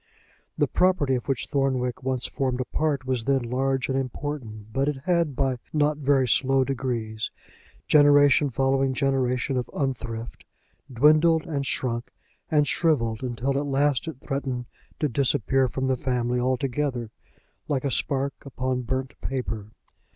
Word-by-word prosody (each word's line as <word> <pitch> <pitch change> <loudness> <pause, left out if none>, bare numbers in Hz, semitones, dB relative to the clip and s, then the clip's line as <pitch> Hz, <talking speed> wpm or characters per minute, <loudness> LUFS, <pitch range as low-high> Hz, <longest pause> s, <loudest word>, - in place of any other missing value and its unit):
The - - +3
property 180 -7 +2
of 125 - -2
which 135 -3 -1
Thornwick 130 -3 0
once 130 -1 -1
formed 130 -2 -1
a 130 - -1
part 145 0 -1
was 130 -3 -1
then 135 -2 +2
large 130 +2 0
and 130 - -1
important; 125 -5 -4
but 135 +2 +1
it 150 -2 0
had, 170 -6 +1
by 130 0 0 0.2
not 150 -1 +2
very 135 -2 +3
slow 135 +3 +3
degrees, 120 -5 -3 0.6
generation 145 -1 +6
following 135 +1 +1
generation 135 -1 0
of 125 -1 -2
unthrift, 120 -4 -3 0.5
dwindled 155 +5 +4
and 140 -4 -2
shrunk 120 -2 -2 0.4
and 150 -2 +3
shriveled, 115 -10 +1
until 130 +2 -2
at 145 - -3
last 140 +1 +1
it 160 -5 -6
threatened 135 -3 -3 0.3
to 150 - +2
disappear 135 0 +1
from 130 +1 -3
the 130 0 +2
family 125 -1 -1
altogether, 130 -1 -1 0.6
like 140 -2 -1
a 140 - 0
spark 140 0 0
upon 130 -1 -2
burnt 130 +2 -3
paper. 115 -6 -3
135 Hz, 145 wpm, -25 LUFS, 125-140 Hz, 0.6 s, generation